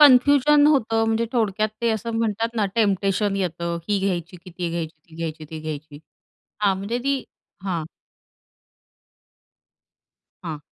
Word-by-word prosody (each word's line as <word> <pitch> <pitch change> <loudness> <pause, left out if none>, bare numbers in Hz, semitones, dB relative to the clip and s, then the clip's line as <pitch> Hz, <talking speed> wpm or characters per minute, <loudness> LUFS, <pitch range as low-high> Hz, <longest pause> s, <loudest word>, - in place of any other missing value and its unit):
Confusion 290 +1 +7
होतं, 225 -6 +3
म्हणजे 225 +1 +1
थोडक्यात 215 -2 +1
ते 235 - +2
असं 225 +1 -2
म्हणतात 225 +1 0
ना 210 -2 +2
टेम्पटेशन 200 -2 +2
येतं. 170 -2 -2
ही 205 -1 +2
घ्यायची, 180 -3 -2
की 180 +1 -13
ती 175 0 -3
घ्यायची, 165 -2 -4
ती 160 - -16
घ्यायची, 160 -1 -4
ती 155 +1 -7
घ्यायची. 155 -1 -6 0.6
हां, 195 -2 +3
म्हणजे 210 +5 -2
ती 275 -1 +1 0.4
हां. 170 -5 -1 2.6
हां. 160 -3 -4
200 Hz, 135 wpm, -23 LUFS, 170-230 Hz, 2.6 s, Confusion